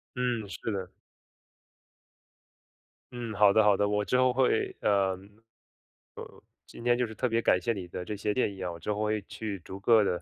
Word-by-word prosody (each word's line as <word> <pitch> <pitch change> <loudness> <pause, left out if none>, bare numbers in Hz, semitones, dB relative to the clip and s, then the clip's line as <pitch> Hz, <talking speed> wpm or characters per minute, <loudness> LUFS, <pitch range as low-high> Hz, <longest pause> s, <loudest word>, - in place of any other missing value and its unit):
嗯， 125 -4 -1
是 105 +3 -5
的。 95 -3 -4 2.2
嗯， 120 -3 -5
好 100 -1 +5
的 110 - +5
好 105 -2 +4
的， 105 - +2
我 105 0 0
之 125 - +1
后 130 -1 +3
会 130 -3 +1
嗯， 105 - +2
呃， 95 -2 +2 1.5
今 115 - -12
天 120 0 +3
就 125 -1 0
是 110 - -10
特 125 - 0
别 115 0 +1
感 90 - +3
谢 115 - 0
你 95 -4 -6
的 90 - -6
这 105 - -5
些 105 +1 -1
建 115 -5 0
议 95 - -10
啊， 90 -1 -2
我 85 - -9
之 105 - -3
后 105 - -3
会 105 0 0
去 100 -2 -6
逐 95 +3 -9
个 110 +1 +5
地 90 -3 -1
105 Hz, 215 characters per minute, -29 LUFS, 100-115 Hz, 2.2 s, 好